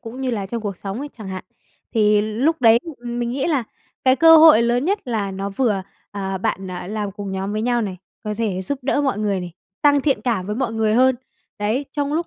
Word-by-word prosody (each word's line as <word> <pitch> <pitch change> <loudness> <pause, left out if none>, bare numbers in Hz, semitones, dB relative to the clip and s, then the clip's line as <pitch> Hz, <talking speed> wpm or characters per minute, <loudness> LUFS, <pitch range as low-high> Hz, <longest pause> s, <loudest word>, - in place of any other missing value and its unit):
cũng 235 +3 -8
như 260 -1 -1
là 205 -5 -3
trong 230 +4 -4
cuộc 200 -3 -4
sống 195 +4 -6
ấy 290 +2 -5
chẳng 210 -3 -7
hạn, 190 -1 -6 0.5
thì 210 -2 +4
lúc 240 +10 0
đấy 230 -1 +6
thì 275 -8 -10
mình 240 0 -2
nghĩ 270 +2 -1
là 285 -7 +1 0.4
cái 260 0 +5
cơ 325 +1 +8
hội 315 -7 +8
lớn 240 +2 +1
nhất 400 +5 +1
là 220 -6 -2
nó 195 +1 -4
vừa 205 -2 0 0.3
à, 195 -1 -4
bạn, 190 0 -2
à, 180 -1 -6
làm 205 0 -3
cùng 200 -1 -6
nhóm 190 +1 -3
với 215 +1 -2
nhau 240 0 +1
này 195 -4 -4 0.3
có 210 0 -2
thể 205 -4 -2
giúp 255 +9 -3
đỡ 270 +2 +1
mọi 270 -7 0
người 205 -3 0
này, 175 -1 -7 0.3
tăng 285 -1 +5
thiện 275 -1 +1
cảm 220 -7 -1
với 210 +1 -3
mọi 245 -3 -1
người 220 -1 +1
hơn, 260 +2 +4 0.4
đấy, 215 +7 -1
trong 290 -1 -2
lúc 335 +2 -1
225 Hz, 245 wpm, -21 LUFS, 200-265 Hz, 0.5 s, cơ